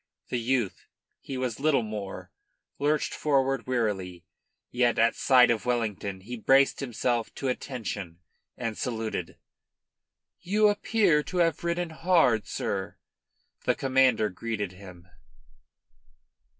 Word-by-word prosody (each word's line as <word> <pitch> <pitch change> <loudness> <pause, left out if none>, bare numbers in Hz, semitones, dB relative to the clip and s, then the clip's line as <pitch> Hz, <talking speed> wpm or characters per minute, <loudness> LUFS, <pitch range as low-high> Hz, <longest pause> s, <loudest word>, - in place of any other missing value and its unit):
The 125 - -1
youth 120 -3 -1 0.3
he 135 - -6
was 130 -3 -3
little 140 -4 +2
more 105 -3 -6 0.5
lurched 150 +2 +1
forward 135 -4 +1
wearily, 95 -8 -2 0.5
yet 120 -1 +2
at 115 +1 +4
sight 125 -3 +5
of 115 +1 -2
Wellington 105 -5 -2
he 120 +6 -7
braced 135 +4 +4
himself 120 -2 -1
to 135 - -2
attention 105 -10 -5 0.4
and 115 -3 -3
saluted. 110 -8 -4 1.0
"You 210 +3 +3
appear 205 -6 +2
to 180 +5 -6
have 165 -2 +2
ridden 170 0 -1
hard, 160 - +2
sir," 95 -1 -3 0.7
the - - +2
Commander 130 -5 +3
greeted 105 -1 -4
him. 90 -2 -13
120 Hz, 115 wpm, -27 LUFS, 105-140 Hz, 1.0 s, sight